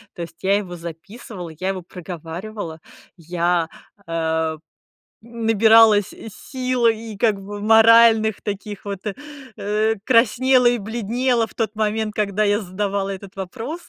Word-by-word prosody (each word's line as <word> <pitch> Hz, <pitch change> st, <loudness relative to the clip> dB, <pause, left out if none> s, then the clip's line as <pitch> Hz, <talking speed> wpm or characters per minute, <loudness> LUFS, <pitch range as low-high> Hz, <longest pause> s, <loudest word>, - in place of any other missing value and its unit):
То -, -, -7 dB
есть 170 Hz, -1 st, -8 dB
я 195 Hz, +1 st, +2 dB
его 185 Hz, -4 st, -5 dB
записывала, 175 Hz, +3 st, -9 dB
я 185 Hz, -, -1 dB
его 190 Hz, -1 st, -3 dB
проговаривала, 175 Hz, +1 st, -7 dB, 0.4 s
я, 170 Hz, 0 st, 0 dB, 0.4 s
эм, 160 Hz, -1 st, -1 dB, 0.6 s
набиралась 225 Hz, -2 st, +4 dB, 0.2 s
сил 255 Hz, -1 st, -2 dB
и, 225 Hz, -1 st, -2 dB
как 205 Hz, -2 st, +1 dB
бы, 205 Hz, +1 st, -7 dB
моральных 225 Hz, 0 st, +5 dB
таких 205 Hz, 0 st, -6 dB
вот, 200 Hz, -2 st, -4 dB, 0.6 s
э, 215 Hz, +2 st, 0 dB
краснела 255 Hz, +1 st, +4 dB
и 240 Hz, 0 st, +3 dB
бледнела 230 Hz, +2 st, -1 dB
в -, -, -19 dB
тот 220 Hz, -2 st, -2 dB
момент, 215 Hz, 0 st, -1 dB
когда 210 Hz, 0 st, 0 dB
я 205 Hz, 0 st, +2 dB
задавала 195 Hz, +1 st, -2 dB
этот 195 Hz, 0 st, -8 dB
вопрос. 225 Hz, -, -6 dB
210 Hz, 130 wpm, -21 LUFS, 185-225 Hz, 0.6 s, моральных